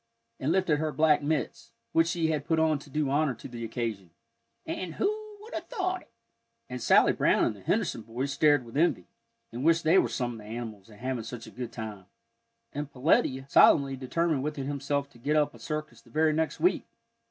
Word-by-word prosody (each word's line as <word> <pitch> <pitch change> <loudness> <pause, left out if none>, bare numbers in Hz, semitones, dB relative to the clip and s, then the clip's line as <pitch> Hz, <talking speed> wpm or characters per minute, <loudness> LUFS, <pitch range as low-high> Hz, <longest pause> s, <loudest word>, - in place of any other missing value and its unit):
and 135 +4 0
lifted 175 -5 +2
her 155 0 -1
black 155 -1 +3
mitts, 145 -3 -2 0.2
which 165 0 +3
she 165 -2 0
had 150 -2 -2
put 160 - +2
on 160 -2 +2
to 140 - -14
do 150 +1 0
honor 145 -2 +2
to - - -10
the 120 -2 -7
occasion, 110 -6 -4 0.6
"and 175 -4 -4
who 425 +1 -2
would 445 +3 -12
have - - -5
thought 370 -6 -2
it!" - - -23 0.6
And - - -6
Sally - - +5
Brown - - +3
and - - -1
the - - -14
Henderson 215 - 0
boys 125 +5 -4
stared 145 -4 +4
with 115 - -12
envy, 155 - +2 0.5
and 120 +3 -5
wished 165 +1 +4
they 170 +4 +5
were - - +1
some 125 -2 -2
of 115 - -8
the 105 - -12
animals 110 -2 -7
and 105 -1 -15
having 130 -2 -2
such 115 +1 -7
a - - -11
good 125 -2 -6
time. 105 -5 -7 0.7
And 145 0 -4
Peletiah 135 -1 +1
solemnly 140 0 +5
determined 145 +3 0
within 145 -1 -3
himself 140 0 -2
to 120 - -18
get 150 +6 0
up 150 -1 +2
a - - -14
circus 150 -6 -5
the - - -21
very 155 0 +2
next 160 0 -1
week. 360 - +2
145 Hz, 210 wpm, -28 LUFS, 120-160 Hz, 0.7 s, Sally